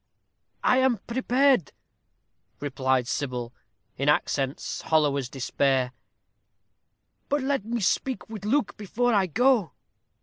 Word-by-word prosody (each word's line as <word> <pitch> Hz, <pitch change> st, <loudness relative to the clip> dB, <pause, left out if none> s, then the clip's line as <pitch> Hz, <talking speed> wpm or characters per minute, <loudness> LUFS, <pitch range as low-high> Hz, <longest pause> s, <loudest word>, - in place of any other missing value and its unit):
"I 255 Hz, -, +4 dB
am 260 Hz, -2 st, +3 dB
prepared," 255 Hz, -, +1 dB, 0.9 s
replied 130 Hz, -3 st, 0 dB
Sybil, 125 Hz, -3 st, -3 dB, 0.4 s
in 140 Hz, +2 st, +1 dB
accents 140 Hz, -1 st, 0 dB
hollow 150 Hz, -3 st, +2 dB
as 135 Hz, -3 st, -3 dB
despair; 135 Hz, -1 st, 0 dB, 1.4 s
"but 290 Hz, 0 st, +1 dB
let 275 Hz, -5 st, 0 dB
me 235 Hz, 0 st, -2 dB
speak 255 Hz, +6 st, 0 dB
with 215 Hz, -3 st, -8 dB
Luke 225 Hz, 0 st, 0 dB
before 235 Hz, +3 st, 0 dB
we 195 Hz, -2 st, +3 dB
go." 245 Hz, -, +2 dB
195 Hz, 110 wpm, -26 LUFS, -, 1.4 s, I